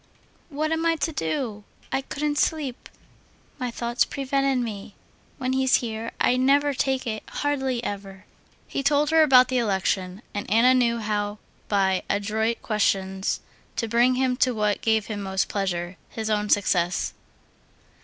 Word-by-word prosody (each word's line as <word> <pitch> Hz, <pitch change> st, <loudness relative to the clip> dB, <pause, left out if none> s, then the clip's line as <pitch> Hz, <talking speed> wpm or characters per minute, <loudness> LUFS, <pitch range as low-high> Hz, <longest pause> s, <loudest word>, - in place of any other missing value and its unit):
"What 310 Hz, +1 st, -2 dB
am 320 Hz, 0 st, 0 dB
I 330 Hz, 0 st, +3 dB
to 325 Hz, +1 st, -1 dB
do? 210 Hz, -, -3 dB, 0.3 s
I 270 Hz, -, 0 dB
couldn't 290 Hz, +2 st, -2 dB
sleep.... 290 Hz, -6 st, -1 dB, 0.7 s
My 250 Hz, -, -2 dB
thoughts 235 Hz, +1 st, 0 dB
prevented 275 Hz, -1 st, 0 dB
me. 215 Hz, -4 st, -4 dB, 0.4 s
When 255 Hz, -1 st, -1 dB
he's 260 Hz, 0 st, +3 dB
here 225 Hz, -1 st, -2 dB
I 250 Hz, -, +3 dB
never 280 Hz, +3 st, +3 dB
take 265 Hz, 0 st, 0 dB
it—hardly 260 Hz, +2 st, -2 dB
ever." 195 Hz, -2 st, -6 dB, 0.4 s
He -, -, -2 dB
told 290 Hz, +2 st, +2 dB
her 320 Hz, 0 st, +6 dB
about 255 Hz, -4 st, +6 dB
the 255 Hz, -1 st, +1 dB
election, 190 Hz, -2 st, -1 dB
and 205 Hz, -, -4 dB
Anna 230 Hz, +5 st, +5 dB
knew 240 Hz, -2 st, +2 dB
how 210 Hz, -1 st, -2 dB, 0.3 s
by 190 Hz, -2 st, +2 dB
adroit 220 Hz, +3 st, -1 dB
questions 195 Hz, -3 st, 0 dB, 0.3 s
to 230 Hz, -, -1 dB
bring 240 Hz, +3 st, +3 dB
him 255 Hz, -1 st, +1 dB
to 255 Hz, -2 st, +2 dB
what 210 Hz, -2 st, 0 dB
gave 220 Hz, -2 st, +2 dB
him 210 Hz, -2 st, -5 dB
most 190 Hz, -1 st, -1 dB
pleasure—his 190 Hz, +2 st, -3 dB
own 210 Hz, 0 st, 0 dB
success. 180 Hz, -3 st, +1 dB
235 Hz, 145 wpm, -25 LUFS, 205-265 Hz, 0.7 s, her